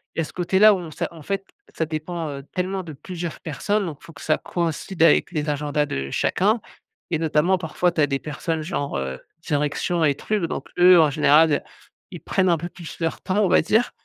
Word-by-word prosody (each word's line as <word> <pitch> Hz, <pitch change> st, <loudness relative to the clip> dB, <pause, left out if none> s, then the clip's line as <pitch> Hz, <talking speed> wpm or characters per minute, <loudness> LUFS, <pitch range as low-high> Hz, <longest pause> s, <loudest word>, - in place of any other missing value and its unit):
il -, -, -3 dB
y -, -, +3 dB
a -, -, -2 dB
ce -, -, -12 dB
côté-là 190 Hz, +4 st, +5 dB
où 190 Hz, -, -1 dB
on 170 Hz, -3 st, -8 dB
ça -, -, -3 dB
en 165 Hz, -2 st, -12 dB
fait, 195 Hz, +5 st, -3 dB, 0.3 s
ça 160 Hz, -, -1 dB
dépend, 160 Hz, +2 st, -4 dB
heu, 140 Hz, -1 st, -6 dB
tellement 185 Hz, +1 st, -2 dB
de 165 Hz, -, -8 dB
plusieurs 170 Hz, +3 st, -6 dB
personnes. 200 Hz, +7 st, -1 dB
Donc, 155 Hz, -5 st, -7 dB
faut -, -, -12 dB
que 140 Hz, -, -14 dB
ça 155 Hz, -, +1 dB
coïncide 170 Hz, +1 st, -3 dB
avec 165 Hz, +2 st, +5 dB
les 155 Hz, -2 st, -2 dB
agendas 150 Hz, 0 st, 0 dB
de 70 Hz, -, -4 dB
chacun 210 Hz, -, +1 dB, 0.5 s
et 165 Hz, -3 st, 0 dB
notamment 160 Hz, +3 st, +2 dB
parfois, 175 Hz, +1 st, 0 dB
tu 160 Hz, -, +1 dB
as 145 Hz, -, +4 dB
des 135 Hz, -1 st, -1 dB
personnes 155 Hz, +2 st, -3 dB
genre 145 Hz, -, -3 dB
heu, 65 Hz, -1 st, -3 dB, 0.3 s
direction 150 Hz, +3 st, 0 dB
et 145 Hz, -2 st, +4 dB
truc. 210 Hz, +4 st, -2 dB
Donc 145 Hz, -, -5 dB
eux, 180 Hz, 0 st, +8 dB
en 155 Hz, -2 st, +5 dB
général, 150 Hz, +1 st, +4 dB, 0.5 s
ils -, -, -7 dB
prennent 190 Hz, -1 st, +1 dB
un 170 Hz, -, +3 dB
peu 170 Hz, +3 st, -5 dB
plus 175 Hz, -3 st, -10 dB
leur 165 Hz, -1 st, -2 dB
temps, 205 Hz, +3 st, +1 dB
on -, -, +2 dB
va -, -, +5 dB
dire 220 Hz, +9 st, +2 dB
165 Hz, 225 wpm, -23 LUFS, 150-180 Hz, 0.5 s, eux